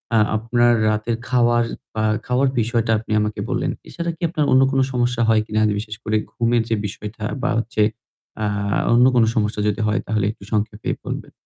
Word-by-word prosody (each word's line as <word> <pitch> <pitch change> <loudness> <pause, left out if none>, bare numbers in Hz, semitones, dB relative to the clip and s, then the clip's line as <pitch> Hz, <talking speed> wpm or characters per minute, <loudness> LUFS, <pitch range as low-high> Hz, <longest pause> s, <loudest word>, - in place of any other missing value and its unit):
আ - - +5 0.2
আপনার 120 +2 +2 0.2
রাতের 110 +2 0
খাওয়ার 120 -1 +3 0.3
বা 110 0 -1 0.2
খাওয়ার 125 +2 +2
বিষয়টা 115 0 0
আপনি 110 - -10
আমাকে 105 0 -2
বললেন। - - 0 0.2
এছাড়া 170 0 -3
কি - - -46
আপনার 155 -3 0
অন্য 130 - +6
কোন 135 - +1
সমস্যা 120 -1 0
হয় 110 -1 +4
কিনা? 110 0 -1
আর - - +2
বিশেষ 105 -1 -6
করে 110 0 +1
ঘুমের 120 0 +1
যে 115 - +2
বিষয়টা 105 +2 -7 0.2
বা 125 - +1
হচ্ছে 115 -1 -2 0.6
আ - - +1 0.5
অন্য 120 +1 +6
কোন 120 - +5
সমস্যা 105 -1 0
যদি 105 +1 0
হয় 105 - +1
তাহলে 105 -3 0
একটু 100 - -15
সংক্ষেপে 105 0 -2 0.2
বলবেন। - - -5
115 Hz, 190 wpm, -21 LUFS, 110-120 Hz, 0.6 s, অন্য